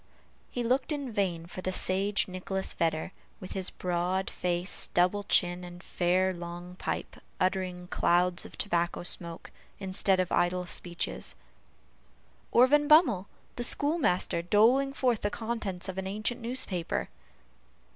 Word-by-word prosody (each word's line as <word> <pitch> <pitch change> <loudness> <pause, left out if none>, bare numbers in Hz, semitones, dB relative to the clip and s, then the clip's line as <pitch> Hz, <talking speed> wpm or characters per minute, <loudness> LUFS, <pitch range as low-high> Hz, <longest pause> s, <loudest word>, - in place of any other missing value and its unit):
He 245 - -3
looked 255 +5 +1
in 285 -4 -3
vain 185 -6 -1
for 180 +2 -7
the 185 - -2
sage 195 +2 +1
Nicholas 190 +1 -2
Vedder, 165 +1 -1 0.3
with 185 - -8
his 190 -1 -1
broad 180 +1 -1
face, 175 +1 0
double 180 +3 +3
chin, 175 -1 +2
and 175 0 -10
fair 185 +1 +1
long 175 0 -7
pipe, - - -4 0.2
uttering 185 -1 -1
clouds 175 0 +2
of - - -12
tobacco 175 -3 0
smoke, 170 -1 -3 0.3
instead 190 0 +1
of 185 -1 0
idle 180 +1 +1
speeches; 175 0 -3 1.2
or 245 - +7
Van 295 +2 +3
Bummel, 270 - +5 0.3
the 240 - -1
schoolmaster, 285 - +1
doling 230 +10 +4
forth 250 -5 +1
the 205 - +1
contents 205 -5 -4
of 190 0 -4
an 190 - -3
ancient 215 +5 -2
newspaper. 230 -8 -2
185 Hz, 135 wpm, -29 LUFS, 175-220 Hz, 1.2 s, or